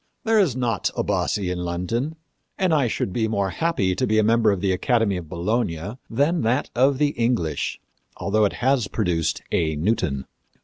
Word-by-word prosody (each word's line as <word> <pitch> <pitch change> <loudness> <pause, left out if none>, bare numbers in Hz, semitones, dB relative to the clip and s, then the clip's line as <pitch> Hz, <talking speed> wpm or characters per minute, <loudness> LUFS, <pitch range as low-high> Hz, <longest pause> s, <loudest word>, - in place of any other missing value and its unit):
There 225 -1 +3
is 170 - +2
not 120 -5 0
a - - +1
Bassi 95 -3 0
in 90 - -3
London, 90 - -2 0.4
and 185 -4 +2
I 140 -5 +3
should 100 -4 -2
be 110 -2 +1
more 100 -3 0
happy 130 - 0
to 90 - -1
be 110 - +2
a 110 - +4
member 115 0 +4
of 100 - -1
the 95 0 +1
Academy 110 +1 +1
of 85 -4 -6
Bologna 95 +2 -2
than 145 +9 +1
of - - -1
that 120 +5 +1
of 135 +2 +3
the 145 +1 +3
English, 115 - -1 0.4
although 105 +2 +2
it 100 - 0
has 130 -5 +3
produced 85 -4 -1
a 80 -3 +1
Newton. 75 -5 0
110 Hz, 190 wpm, -23 LUFS, 90-130 Hz, 0.4 s, a